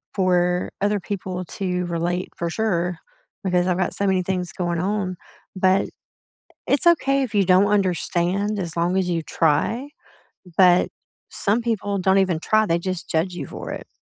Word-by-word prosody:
For 180 -1 +2
other 205 0 +1
people 185 -1 -4
to 180 0 -3
relate, 175 +2 -2
for 170 0 -2
sure, 180 -4 -1 0.4
because 180 -1 +1
I've 180 -1 +1
got 190 - 0
so 200 - -1
many 190 -1 +2
things 180 -1 -3
going 175 -2 -2
on, 185 -1 -1 0.4
but 185 +1 +3 0.8
it's 280 +4 +1
okay 275 -5 +4
if 235 -5 -4
you 200 - +4
don't 190 +2 +5
understand 195 +1 0
as 175 -3 -4
long 175 +3 +1
as 185 -2 0
you 170 -2 0
try, 170 - 0 0.7
but 180 -2 +5 0.4
some 215 +3 +1
people 205 -3 -1
don't 190 +1 +3
even 185 -4 +2
try, 215 +3 +3
they 170 -2 +1
just 185 0 -4
judge 165 +3 0
you - - -5
for - - -7
it. - - -7
185 Hz, 165 wpm, -22 LUFS, 175-200 Hz, 0.8 s, don't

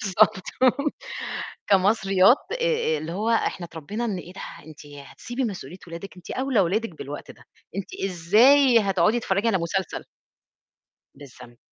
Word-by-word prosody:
بالضبط 210 0 +3 1.3
كمصريات 195 +2 +4 0.2
آآ - - -1 0.4
آآ 155 - -1
اللي 155 +2 -6
هو 215 +5 -1
إحنا 195 -5 0
اتربينا 170 +9 -5
إن 205 -5 -2
إيه 180 0 -10
ده! 190 - -10 0.3
أنتِ 155 -1 -13
هتسيبي 145 - -6
مسؤولية 185 - -6
ولادِك 170 +3 -9
أنتِ 180 - -12
أوْلى 260 -4 +1
ولادِك 200 +4 0
بالوقت 145 +1 -7
ده، - - -15 0.3
أنتِ 195 - -5 0.2
إزاي 235 +9 +5
هتقعُدي 200 +3 +2
تتفرّجي 200 +1 0
على 195 -4 +2
مسلسل؟! 175 +2 -3 1.1
بالضبط، 125 -4 -14
190 Hz, 140 wpm, -24 LUFS, 170-220 Hz, 1.3 s, إزاي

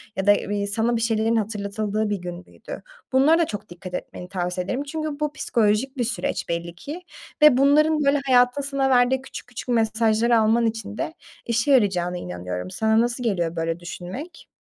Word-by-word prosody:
ya 190 - -2
da, 205 - +8
iii, 205 0 -2
sana 225 +4 +1
bir 230 - -1
şeylerin 225 0 +1
hatırlatıldığı 210 0 -1
bir 205 - 0
gün 175 0 -7
müydü? - - -10 0.3
Bunlara 290 +6 +5
da 335 - +3
çok 205 -6 -7
dikkat 180 +1 -10
etmeni 180 0 -6
tavsiye 180 -1 -2
ederim 255 +8 -2
çünkü 305 0 -4
bu 300 -1 -1
psikolojik 230 +1 0
bir 245 - +1
süreç 240 - -2
belli 170 0 -3
ki 295 - -7 0.4
ve 300 -4 +8
bunların, 300 +3 +4
böyle, 280 +1 +3
hayatın 250 +1 +4
sana 275 -1 0
verdiği 255 +1 +3
küçük 265 - -9
küçük 245 +1 -8
mesajları 225 0 +3
alman 225 +2 +3
için 220 -2 -3
de - - -3 0.3
işe 235 +4 +1
yarayacağına 185 -8 +2
inanıyorum. 90 - -5
Sana 220 0 +2
nasıl 240 +1 -1
geliyor 175 -7 0
böyle 165 0 -2
düşünmek? 190 - -8
225 Hz, 180 wpm, -23 LUFS, 190-265 Hz, 0.4 s, da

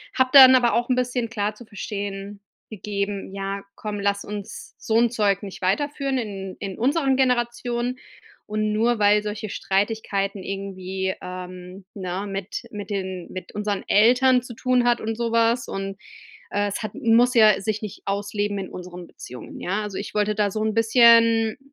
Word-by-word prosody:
habe 260 0 +3
dann 260 -2 +10
aber 240 -2 +3
auch 240 +1 0
'n 255 - +3
bisschen 250 -2 -1
klar 210 -1 -2
zu 240 - -13
verstehen 200 -1 -6 0.3
gegeben: 200 -1 -4
„Ja, 195 0 -4
komm, 210 -1 -5
lass 200 0 -1
uns 205 -1 -8
so 220 - 0
'n 235 -1 +3
Zeug 205 -4 +1
nicht 195 - -8
weiterführen 275 +7 0
in 195 -5 -5
in 195 -2 -5
unseren 270 +2 +2
Generationen 245 -1 0 0.5
und 215 0 -1
nur, 230 +3 +2
weil 210 0 +4
solche 210 0 -5
Streitigkeiten 200 0 -1
irgendwie, 190 -1 -4
ähm, 180 +1 -8
ne, 190 0 -4
mit 195 +2 -5
mit 205 -1 -7
den 190 -3 -4
mit 185 - -8
unseren 205 -1 -2
Eltern 250 +4 +5
zu 245 -1 -10
tun 250 +1 +2
hat 240 0 +3
und 225 +1 -3
sowas 230 0 +1
und, 195 0 -5 0.5
äh, 205 0 0
es 200 - -4
hat 215 - -5
muss 235 +2 +3
ja 215 -4 +6
sich 215 +1 -2
nicht 210 -3 -7
ausleben 205 +1 -2
in 190 -1 -5
unseren 180 -1 -9
Beziehungen, 125 0 -10
ja?“ 200 +4 -1
Also, 205 -2 -5
ich 200 - -6
wollte 210 0 +1
da 205 -1 +1
so 215 - -3
'n 220 0 0
bisschen, 230 -1 +5
210 Hz, 170 wpm, -23 LUFS, 195-235 Hz, 0.5 s, dann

